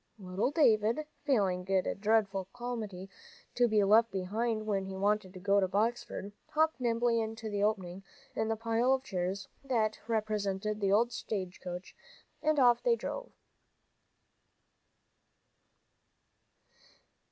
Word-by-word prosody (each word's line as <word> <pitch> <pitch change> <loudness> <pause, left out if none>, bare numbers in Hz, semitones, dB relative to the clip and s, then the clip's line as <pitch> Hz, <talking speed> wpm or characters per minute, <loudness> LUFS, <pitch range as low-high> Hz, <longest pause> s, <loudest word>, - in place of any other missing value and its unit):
Little 190 +3 -1
David, 235 -2 +3 0.2
feeling 190 -9 +1
it 190 -1 +2
a - - 0
dreadful 200 -2 +1
calamity 220 -6 -5 0.5
to 245 0 +3
be 215 -2 +3
left 220 +3 +5
behind 215 +4 -1
when 200 -3 0
he 190 0 -6
wanted 200 -1 +1
to - - -7
go 200 +2 +3
to 190 - +2
Boxford, 215 +1 -1 0.2
hopped 315 -1 +1
nimbly 235 -1 +2
into 220 0 -5
the 205 -1 -1
opening 195 -3 -1 0.3
in 220 - 0
the 225 - 0
pile 230 +3 +2
of 265 0 0
chairs 190 -2 -3 0.2
that 225 -5 0
represented 215 -1 -1
the 200 +4 +4
stage 190 -6 -4
coach, 180 0 -7 0.5
and 310 0 +2
off 245 -2 +5
they 475 -1 +3
drove. - - -6
215 Hz, 130 wpm, -31 LUFS, 195-235 Hz, 0.5 s, left